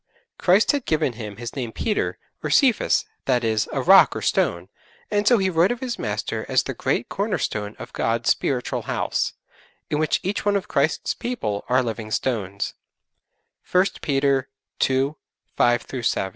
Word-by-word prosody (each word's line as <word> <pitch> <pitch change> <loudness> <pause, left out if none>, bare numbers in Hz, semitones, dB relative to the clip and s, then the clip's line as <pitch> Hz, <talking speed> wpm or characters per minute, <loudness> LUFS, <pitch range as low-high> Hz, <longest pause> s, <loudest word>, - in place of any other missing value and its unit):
Christ 185 +4 +4
had 285 -4 -3
given 155 -5 +1
him 110 -3 -7
his 120 +2 -7
name 125 -5 -3
'Peter' 210 - -1 0.2
or - - -3
'Cephas,' 260 -7 +3 0.2
that 125 -2 +2
is, 110 -1 0
a - - -1
rock - - +7
or - - -3
stone, 85 +1 +1 0.4
and 205 0 +1
so 240 - +6
he 190 -2 +1
wrote 175 +2 +3
of 245 - -3
his 255 -2 -4
Master - - -3
as - - +3
the - - -4
great - - -1
Corner 205 +1 -1
stone 105 0 -3
of - - -10
God's 115 +1 +1
spiritual 125 -3 -1
house, - - -1 0.6
in 150 - +1
which 155 - +1
each 195 +3 -2
one 205 0 +2
of 200 - -1
Christ's 145 +3 0
people 220 - -3
are 130 +1 +3
living 115 -2 -4
stones, 100 -4 -2 1.0
(1 180 +1 +5 0.2
Peter 135 -1 +1 0.4
ii. 135 +2 +1 0.4
5 120 -1 +3 0.2
7.) 95 -4 0
135 Hz, 170 wpm, -23 LUFS, -, 1.0 s, rock